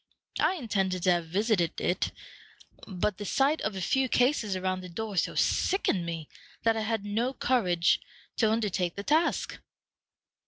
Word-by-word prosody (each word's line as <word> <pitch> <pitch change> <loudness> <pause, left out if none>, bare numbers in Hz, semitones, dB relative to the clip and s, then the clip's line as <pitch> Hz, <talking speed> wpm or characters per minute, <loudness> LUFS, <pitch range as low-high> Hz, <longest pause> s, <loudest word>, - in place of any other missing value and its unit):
I 375 - +3
intended 195 - -1
to 185 - +4
have 170 -2 0
visited 190 -1 +1
it, 180 - 0 0.8
but 195 +1 -2
the - - -4
sight 275 - +1
of 215 - -2
a 190 - -4
few 265 +7 +1
cases 245 -6 +2
around 185 0 -1
the 180 - -9
door 215 +3 -5
so 175 - 0
sickened 195 - +1
me 165 -2 -4 0.4
that 225 0 +3
I 220 - -1
had 220 -1 -2
no 230 +6 -1
courage 180 -11 +2 0.4
to 220 - +3
undertake 200 -6 0
the 200 - -5
task." 315 +7 +1
205 Hz, 160 wpm, -29 LUFS, 180-230 Hz, 0.8 s, to